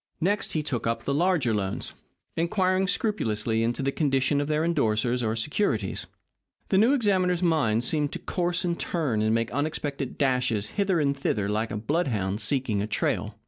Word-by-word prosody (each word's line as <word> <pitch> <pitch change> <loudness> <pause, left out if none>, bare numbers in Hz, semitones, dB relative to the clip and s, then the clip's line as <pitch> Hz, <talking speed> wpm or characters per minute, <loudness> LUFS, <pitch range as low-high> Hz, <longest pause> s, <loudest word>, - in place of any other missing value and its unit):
Next, 200 +5 0
he 155 - 0
took 125 -6 -2
up 115 - -1
the 140 - -1
larger 155 -6 +2
loans, 100 -2 -3 0.4
inquiring 185 +2 +1
scrupulously 115 - 0
into 120 +4 -1
the 135 - +1
condition 140 -1 +1
of 145 - -2
their 155 0 +1
endorsers 125 -7 +1
or 110 -1 0
securities. 115 - -1 0.6
The 190 - +4
new 230 +6 +5
examiner's 185 -8 +2
mind 135 -10 +2
seemed 150 +2 0
to - - -3
course 180 0 -1
and 170 -1 -1
turn 140 -11 -1
and 110 +1 +2
make 115 0 -1
unexpected 145 -1 -3
dashes 125 -6 +1
hither 195 -4 +1
and 140 -2 +1
thither 105 -7 -1
like 110 +2 -1
a - - -4
bloodhound 110 - -1
seeking 115 -3 +1
a 105 - -2
trail. - - -1
140 Hz, 175 wpm, -26 LUFS, 115-175 Hz, 0.6 s, new